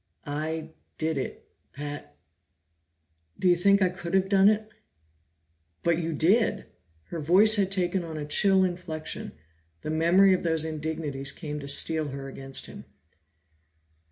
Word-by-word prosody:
"I 155 +2 -4 0.3
did 160 0 -1
it, 130 - -6 0.3
Pat? 145 - -7 1.2
Do 185 - 0
you 175 - +6
think 200 +3 +4
I 185 - +3
could 175 0 -4
have 190 0 +2
done 195 0 +6
it?" 215 0 0 1.2
"But 170 -1 +2
you 165 -1 -2
did!" 200 +6 +2 0.4
Her 170 - -4
voice 190 +8 +5
had 195 -2 +1
taken 185 -1 0
on 160 -2 -6
a 150 - -4
chill 190 +5 +4
inflection; 175 -4 -4 0.5
the 155 - -4
memory 175 +5 +5
of 185 - 0
those 160 -2 0
indignities 155 -3 -3
came 150 -3 -6
to 140 - -8
steel 155 +2 +1
her 135 0 -6
against 135 0 -5
him. - - -11
165 Hz, 145 wpm, -27 LUFS, 150-190 Hz, 1.2 s, you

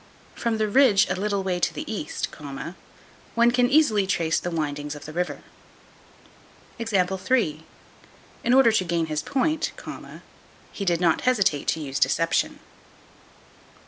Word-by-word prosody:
From 230 -1 -1
the 215 0 +1
ridge 215 -2 +5
a - - +1
little 200 +1 -1
way 180 -2 -1
to - - +1
the - - -4
east, 205 -9 -4 1.1
one 235 +1 +5
can 245 0 +3
easily 230 -10 +3
trace 165 -4 +1
the 175 - -4
windings 150 -2 -3
of 145 - -10
the 155 - -8
river. 180 +2 -3 1.4
In 190 - -2
order 265 -4 +6
to 220 -4 +2
gain 170 -2 0
his 155 -1 -2
point, 310 +4 0 1.0
he 200 - -5
did 175 -2 +1
not 170 -3 +3
hesitate 200 - +1
to - - +1
use 135 -2 -3
deception. 165 0 +1
190 Hz, 135 wpm, -25 LUFS, 165-230 Hz, 1.4 s, order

